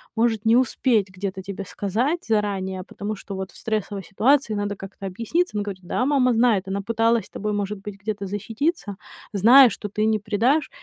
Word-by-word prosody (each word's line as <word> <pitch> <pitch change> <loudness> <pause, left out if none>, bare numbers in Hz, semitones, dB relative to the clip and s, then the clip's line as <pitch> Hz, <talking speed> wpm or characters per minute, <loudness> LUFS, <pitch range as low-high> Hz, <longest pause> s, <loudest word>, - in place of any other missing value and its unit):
может 225 -1 +1
не 225 +2 +5
успеть 240 -4 +2
где-то 190 0 -4
тебе 195 +1 -6
сказать 235 - -2
заранее, 195 -4 -1
потому 210 +1 -5
что 195 0 -8
вот 190 -1 -5
в - - -23
стрессовой 210 -2 -3
ситуации 240 - +2
надо 205 0 -2
как-то 195 0 -9
объясниться. 230 - -1
Она 205 - 0
говорит, 190 -2 -6
да, 240 +8 -1
мама 265 -3 +3
знает, 225 -5 +2
она 195 +1 -2
пыталась 230 +2 +2
с 200 - -12
тобой, 210 +1 -3
может 205 0 -2
быть, 200 0 -8
где-то 205 -1 -4
защититься, 215 - -2 0.4
зная, 240 +6 +8
что 210 - -6
ты 215 +2 -1
не 220 -1 +2
предашь, 230 +9 +1
210 Hz, 190 wpm, -23 LUFS, 195-230 Hz, 0.4 s, зная